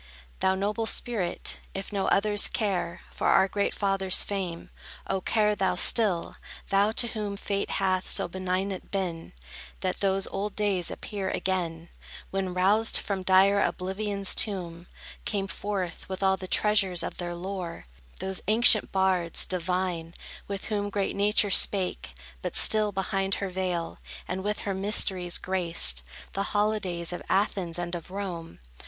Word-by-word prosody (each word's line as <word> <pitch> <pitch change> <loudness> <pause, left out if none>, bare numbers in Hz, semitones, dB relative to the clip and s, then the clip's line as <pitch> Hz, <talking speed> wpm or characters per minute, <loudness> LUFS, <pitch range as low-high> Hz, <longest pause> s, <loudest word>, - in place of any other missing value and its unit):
Thou 190 0 +2
noble 210 +3 -1
spirit, 210 -7 -1 0.2
if 195 +2 -5
no 195 -1 0
others 205 +1 +3
care 190 -5 -2
For - - -2
our 190 - +5
great 200 +1 0
Fathers' 195 -2 +2
fame, 185 -4 -4 0.3
oh, 190 -1 -1
care 210 +1 +2
thou 190 -2 +1
still, 190 -2 +2 0.3
Thou, 200 +2 +3
to 235 +1 +2
whom 205 -2 -4
Fate 200 0 -2
hath 185 -1 0
so - - 0
benignant 185 +1 -3
been, 180 -4 -3 0.5
That 185 -1 -2
those 195 -1 +1
old 200 +1 -4
days 200 -4 0
appear 200 -3 -4
again, 170 -3 -2 0.4
When, 190 -1 -1
roused 205 +5 +3
from 200 -2 -3
dire 190 +2 +5
oblivion's 195 +1 -1
tomb, 175 -5 -1 0.4
Came 200 -2 -1
forth, 195 -3 -4
with 190 +1 -4
all 190 0 +4
the 190 -1 -7
treasures 195 -4 +2
of - - -5
their 175 -1 -4
lore, 180 - -5 0.3
Those 190 -1 -2
ancient 220 0 +5
bards, 190 -3 +2
divine, 180 -2 -2 0.3
with 200 -1 -4
whom 205 -1 -1
Great 200 -1 -1
Nature 205 0 +2
spake, 185 - +2 0.3
but - - -4
still 215 -1 +5
behind 195 0 -1
her 195 - -3
veil, 180 -2 -3 0.3
And 190 +1 -3
with 210 +1 -2
her 200 - -2
mysteries 190 -2 +2
graced 170 - +2 0.3
The 195 - -1 0.2
holidays 190 -5 0
of 175 - -5
Athens 190 -3 +1
and 175 0 -4
of 170 -1 -5
Rome. 180 -4 -5
190 Hz, 150 wpm, -27 LUFS, 180-205 Hz, 0.5 s, our